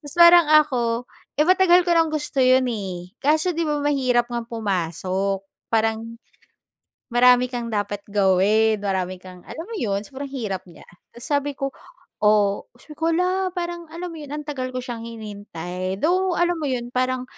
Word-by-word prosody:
Tapos, 290 - -9
parang 340 -1 +8
ako, 250 -6 +3 0.3
eh, - - +6
matagal 365 -1 +5
ko 350 - +1
nang 330 -1 +3
gusto 295 -2 -3
'yon, 255 0 +4
eh. 185 -3 -6
Kaso 310 +5 +2
'di 335 - -1
ba, 295 -1 0
mahirap 255 -4 +1
ngang 235 -1 -3
pumasok. 195 -2 -2 0.3
Parang, 225 +1 0 0.9
marami 250 +1 +5
kang 240 -1 -3
dapat 205 -1 -2
gawin. 205 +2 +3
Marami 185 -2 -2
kang, 185 -1 -13
alam 325 - -7
mo 455 0 -6
'yon, 200 -6 -1
sobrang 280 0 -7
hirap 215 -9 -4
niya. 170 - -15 0.3
Tapos, 235 - -9
sabi 285 0 +1
ko, 275 0 -2 0.5
"Oh, 210 -1 +3 0.3
hala, 360 +3 +1
parang 345 -1 -4
alam 345 +1 -6
mo - - -9
yon, 290 - -9
ang 300 0 -5
tagal 260 -3 -3
ko 255 - -3
siyang 240 -2 -6
hinintay." 190 -4 -6
Though, 365 +2 +1
alam 350 0 +2
mo - - -3
'yon, 240 -1 -3
parang 255 0 0
245 Hz, 165 wpm, -23 LUFS, 205-305 Hz, 0.9 s, parang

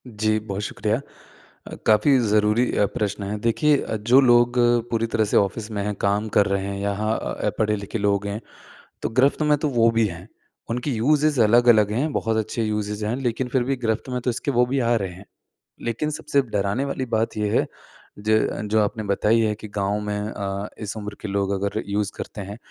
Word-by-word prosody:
जी, 110 -1 0
बहुत 100 -2 -5
शुक्रिया। 110 +3 -1 0.7
अ, - - -7
काफ़ी 130 +6 +5
ज़रूरी 105 +1 +2
अ, 105 - +4
प्रश्न 105 -1 -2
है, 100 +2 -3
देखिए 115 +7 +2 0.2
जो 130 +2 +8
लोग 120 -1 +4 0.4
पूरी 115 -1 +1
तरह 110 -1 +1
से - - +4
ऑफिस 105 +3 0
में 105 -2 -2
हैं, 105 0 -2
काम 100 +2 +1
कर 105 - +5
रहे 100 -1 -1
हैं, 100 0 -4
यहाँ 105 +2 -1 0.4
पढ़े-लिखे 105 0 -1
लोग 100 0 +1
हैं, 100 +2 -4 0.6
तो - - -1
गिरफ्त 130 +6 +2
में 150 -1 +3
तो 150 - 0
वो 115 -3 +3
भी 115 - +4
हैं। 90 +1 -9 0.4
उनकी 125 +4 -2
यूज़ेज़ 145 +3 +2
अलग-अलग 110 -1 +5
हैं, 135 +8 0
बहुत 115 0 0
अच्छे 110 +1 -2
यूज़ेज़ 105 -1 -2
हैं 115 - -1
लेकिन 125 -1 -2
फिर 125 0 +1
भी 135 +2 0
गिरफ्त 110 +3 -1
में 125 -1 -2
तो 125 - -1
इसके 135 +4 -2
वो 125 -1 +3
भी 135 +2 -1
आ 120 -1 +2
रहे 95 -4 -3
हैं, 95 +3 -13 0.6
लेकिन 120 +6 -2
सबसे 140 -2 0
डराने 105 +1 -1
वाली 135 -2 -3
बात 110 0 -1
ये 105 -1 0
है - - +1 0.5
ज 110 +1 +1
जो 110 - +4
आपने 110 +2 -1
बताई 105 +3 +2
है 110 -1 +1
कि 110 +1 -10
गाँव 100 +1 0
में 105 0 -3
अ, 100 -1 -4
इस 105 0 -5
उम्र 105 -1 -6
के 105 - -5
लोग 100 0 -1
अगर 100 +3 -2
यूज़ 100 0 -1
करते 110 - -7
हैं, 100 +2 -7
110 Hz, 205 wpm, -23 LUFS, 105-120 Hz, 0.7 s, जो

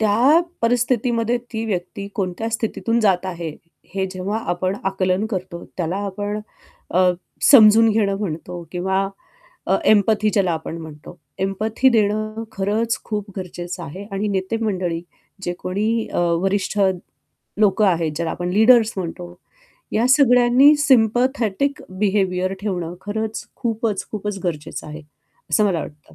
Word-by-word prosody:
त्या 235 +10 +4 0.2
परिस्थितीमध्ये 235 0 +1 0.2
ती 220 0 -2
व्यक्ती 195 -1 -4
कोणत्या 195 +2 -2
स्थितीतून 230 +1 -1
जात 190 -4 +2
आहे, 170 -3 -4 0.4
हे 190 -1 0
जेव्हा 190 +3 -3
आपण 185 +2 -1
आकलन 190 +1 0
करतो, 185 -4 -5
त्याला 175 0 -2
आपण 205 +2 -3 0.5
अ, 185 +1 +4 0.4
समजून 225 -3 +8
घेणं 205 -2 +1
म्हणतो 175 -2 -5
किंवा 190 +2 0 0.8
एम्पथी 215 -1 +4
ज्याला 190 -4 +1
आपण 160 0 -4
म्हणतो, 155 -2 -11 0.2
एम्पथी 215 +6 +1
देणं 215 0 0
खरंच 220 +3 0
खूप 210 -2 -4
गरजेचं 180 -1 -6
आहे 175 +6 -7
आणि 200 +2 -1
नेतेमंडळी 190 -3 -1 0.4
जे 175 - -1
कोणी 215 +5 -1
अ, - - -3 0.2
वरिष्ठ 195 +2 -1 0.8
लोक 210 0 +3
आहेत 170 -6 +2
ज्याला 165 0 -1
आपण 175 0 -3
लीडर्स 220 +2 +5
म्हणतो, 175 -1 -5 0.6
या 230 +3 +2
सगळ्यांनी 255 +1 +6
सिम्पॅथेटिक 255 -1 +2 0.2
बिहेवियर 190 -2 +1
ठेवणं, 180 -5 -3
खरंच 220 +2 -4
खूपच, 225 -3 -2
खूपच 210 -1 -4
गरजेचं 155 -4 -4
आहे, 155 +1 -8 0.5
असं 215 - +3
मला 185 -5 +1
वाटतं 150 -1 -11
205 Hz, 125 wpm, -21 LUFS, 185-225 Hz, 0.8 s, समजून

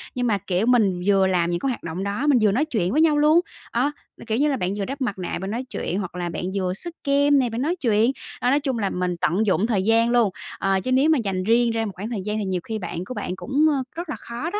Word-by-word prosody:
nhưng 245 -1 0
mà, 205 -3 +2
kiểu, 185 +3 -1
mình 210 -8 +3
vừa 195 -1 +4
làm 175 -2 +1
những 175 - -1
cái 270 - -1
hoạt 245 - -4
động 170 +3 -4
đó, 205 +9 -2
mình 275 -4 +5
vừa 210 -2 +4
nói 275 +9 +1
chuyện 205 - -1
với 305 +5 +3
nhau 305 -2 +4
luôn. 305 +3 +5 0.3
Ờ, 260 +5 +1 0.4
kiểu 220 +1 0
như 295 +2 +3
là, 270 - 0
bạn 180 -2 -1
vừa 200 - -2
đắp 275 +1 -6
mặt 205 -6 -1
nạ 180 - -3
bạn 195 +2 -4
nói 240 +3 -2
chuyện, 185 - -3
hoặc 180 -2 -5
là 175 -1 -3
bạn 170 - -5
vừa 185 -2 0
xức 335 - -6
kem 285 0 +4
nè, 250 -3 +1
bạn 230 +3 -3
nói 330 +6 0
chuyện, 230 - +2 0.3
đó, 245 - +2
nói 285 +2 +3
chung 265 -5 -2
là 200 - 0
mình 180 -1 -2
tận 180 +9 +2
dụng 200 +2 +2
thời 200 -5 +1
gian 230 +2 +3
luôn. 240 -4 +3 0.3
Ờ, 195 0 +1
chứ 255 - -2
nếu 270 +5 +4
mà 315 - +4
dành 185 -2 -2
riêng 230 +2 +3
ra 225 0 -1
một 205 - -4
khoảng 205 +5 -5
thời 215 -5 -3
gian 210 0 -2
thì 210 - -2
nhiều 185 -2 -2
khi 220 -1 -4
bạn 175 -1 -5
của 255 - -6
bạn 180 - -4
cũng, 280 +9 +1
ơ, 275 -3 0
rất 340 -1 -5
là - - -2
khó 240 +8 -5
đó, 415 - -3
225 Hz, 300 wpm, -23 LUFS, 190-270 Hz, 0.4 s, mình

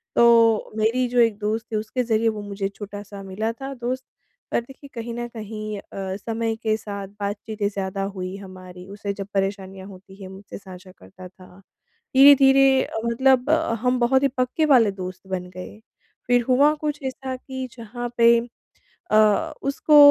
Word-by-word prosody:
तो 230 -2 +5
मेरी 230 +4 +1
जो 245 0 +1
एक 225 -3 +4
दोस्त 215 +2 -2
थी - - -2
उसके 220 +4 -2
ज़रिए 225 -1 +2
वो 215 -1 -4
मुझे 200 -1 -4
छोटा 205 -1 -7
सा 200 -1 -10
मिला 200 +4 -3
था 270 +3 -7
दोस्त 255 +1 -4 0.5
पर - - +1
देखिए 270 +3 -14
कहीं 235 0 -5
न 240 0 -4
कहीं 215 -1 -6
अ, 190 -1 -6
समय 225 +1 -2
के 215 -1 +1
साथ 200 -2 -6
बातचीतें 205 +1 -3
ज़्यादा 195 -1 -3
हुई 185 0 -5
हमारी, 185 -2 -11
उसे 200 0 -5
जब 195 -1 -7
परेशानियाँ 195 -1 -3
होती 195 0 -14
है 185 - -8
मुझसे 190 +1 -10
साझा 185 -1 -12
करता 180 - -13
था, 185 0 -17 0.6
धीरे-धीरे 270 -1 +7
अ, - - -5
मतलब 255 +3 +3
अ, 315 -6 +2
हम 250 0 +1
बहुत 265 +3 +3
ही - - +5
पक्के 255 +5 +1
वाले 245 -8 +5
दोस्त 185 0 -8
बन 180 -1 -4
गए, 185 +3 -9 0.5
फिर 245 0 +4
हुआ 280 +4 +5
कुछ 295 -1 -2
ऐसा 260 0 -4
कि 260 0 -6
जहाँ 240 +1 -6
पे 235 0 +6 0.7
अ, 215 +8 +4
उसको 280 +2 +3
220 Hz, 175 wpm, -23 LUFS, 195-250 Hz, 0.7 s, धीरे-धीरे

